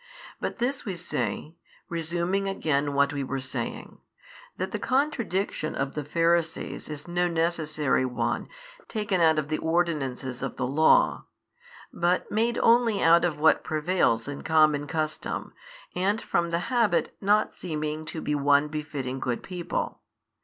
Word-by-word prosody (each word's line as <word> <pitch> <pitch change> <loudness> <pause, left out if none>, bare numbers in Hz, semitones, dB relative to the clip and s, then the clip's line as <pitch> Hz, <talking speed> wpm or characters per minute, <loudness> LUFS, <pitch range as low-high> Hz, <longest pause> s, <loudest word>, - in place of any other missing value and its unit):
But - - -3
this 265 +3 -1
we 195 -4 -4
say, 150 -4 -3 0.3
resuming 170 +4 -1
again 145 -6 0
what 140 0 +3
we 140 -1 -2
were 135 +1 -3
saying, 130 0 -5 0.6
that - - -3
the - - -3
contradiction 235 - -1
of 135 0 -2
the 150 - -3
Pharisees 165 +2 0
is 150 +1 -7
no 175 +1 +1
necessary 160 -5 0
one 125 -1 -2 0.4
taken 210 -5 -1
out 160 -1 +5
of 150 -1 -1
the 155 - -1
ordinances 145 -7 -1
of 135 - -4
the - - -1
Law, 150 +5 +4 0.7
but 175 +1 0
made 230 +2 +1
only 230 -3 +4
out 170 +1 +6
of 170 -4 0
what 160 +1 +4
prevails 155 -7 +1
in 145 0 -5
common 155 -2 +3
custom, 155 0 -3 0.4
and 195 +4 +1
from 170 0 0
the 170 +7 -2
habit 230 -8 +2
not 210 +2 +3
seeming 155 -2 -4
to 160 0 -5
be 150 - -1
one 145 +1 +3
befitting 145 -4 -4
good 125 -2 -2
people. 180 -2 -4
160 Hz, 145 wpm, -27 LUFS, 145-180 Hz, 0.7 s, out